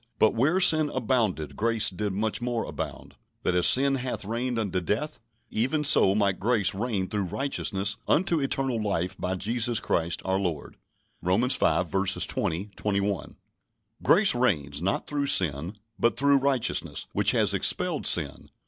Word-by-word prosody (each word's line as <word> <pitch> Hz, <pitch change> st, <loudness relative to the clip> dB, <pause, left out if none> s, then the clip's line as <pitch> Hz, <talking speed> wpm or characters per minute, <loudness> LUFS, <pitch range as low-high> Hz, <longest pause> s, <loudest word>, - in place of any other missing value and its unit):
"But 110 Hz, -, +3 dB
where 145 Hz, +11 st, +1 dB
sin 155 Hz, -4 st, +5 dB
abounded, 110 Hz, -, -1 dB
grace 115 Hz, -1 st, +1 dB
did 105 Hz, +2 st, -3 dB
much 110 Hz, +5 st, -2 dB
more 120 Hz, -2 st, -2 dB
abound; -, -, -7 dB, 0.3 s
that -, -, 0 dB
as 90 Hz, -1 st, +3 dB
sin 135 Hz, +1 st, +5 dB
hath 125 Hz, -5 st, -3 dB
reigned 120 Hz, +3 st, -3 dB
unto 95 Hz, -5 st, -2 dB
death, 110 Hz, -, -3 dB, 0.3 s
even 135 Hz, +7 st, 0 dB
so 100 Hz, -9 st, +4 dB
might 100 Hz, -3 st, 0 dB
grace 110 Hz, -2 st, +1 dB
reign 100 Hz, -2 st, -2 dB
through 100 Hz, -1 st, -2 dB
righteousness 100 Hz, -3 st, -2 dB
unto 170 Hz, 0 st, +2 dB
eternal 135 Hz, -4 st, -1 dB
life 95 Hz, -3 st, -2 dB
by 95 Hz, +1 st, -2 dB
Jesus 115 Hz, +4 st, 0 dB
Christ 85 Hz, +1 st, -1 dB
our 95 Hz, 0 st, 0 dB
Lord" 85 Hz, -7 st, -4 dB, 0.4 s
(Romans 100 Hz, +9 st, +1 dB
v. -, -, +1 dB, 0.4 s
20, 95 Hz, +6 st, -3 dB
21). 100 Hz, -2 st, -2 dB, 0.7 s
Grace 195 Hz, +2 st, +4 dB
reigns, 80 Hz, -, -1 dB
not 95 Hz, +2 st, -1 dB
through 145 Hz, -1 st, -2 dB
sin, 85 Hz, -, +1 dB, 0.2 s
but 115 Hz, -, +1 dB
"through 140 Hz, 0 st, +4 dB
righteousness" 135 Hz, -3 st, -1 dB
which -, -, +2 dB
has -, -, +3 dB
expelled -, -, +2 dB
sin. -, -, 0 dB
110 Hz, 150 wpm, -26 LUFS, 95-130 Hz, 0.7 s, sin